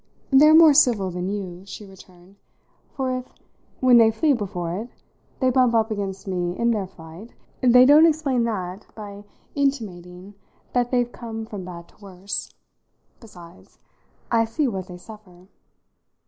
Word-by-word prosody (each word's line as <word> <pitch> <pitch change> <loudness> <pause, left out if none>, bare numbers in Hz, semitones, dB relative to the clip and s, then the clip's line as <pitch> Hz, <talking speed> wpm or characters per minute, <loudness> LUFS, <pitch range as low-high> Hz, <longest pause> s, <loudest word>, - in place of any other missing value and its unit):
"They're 300 +3 +7
more 320 -2 +8
civil 215 -9 +3
than 180 +1 -4
you," 190 -3 -6
she 210 - -9
returned; 190 0 -18 0.5
"for 260 -2 -2
if, 255 - -15 0.5
when 255 -2 +6
they 225 -1 +6
flee 285 +7 +1
before 180 -7 -4
it, 225 +6 -6 0.5
they 260 -1 +2
bump 250 -2 +2
up 225 0 +1
against 195 -1 -5
me 180 -1 -3
in 235 0 +1
their 205 -4 -2
flight, 175 +4 -14 0.3
they 250 0 +6
don't 300 +4 +7
explain 290 -6 0
that 190 -3 -5
by 205 -1 -10 0.3
intimating 200 -9 -4 0.4
that 245 -1 +1
they're 245 -1 +1
come 225 -2 -8
from 205 -4 -8
bad 170 -1 -10
to - - -25
worse. 190 0 -6 0.7
Besides, 175 -6 -16 0.5
I 230 -1 +3
see 275 +6 -1
what 190 -6 -5
they 180 - -10
suffer." 185 -3 -15
210 Hz, 150 wpm, -23 LUFS, 185-245 Hz, 0.7 s, more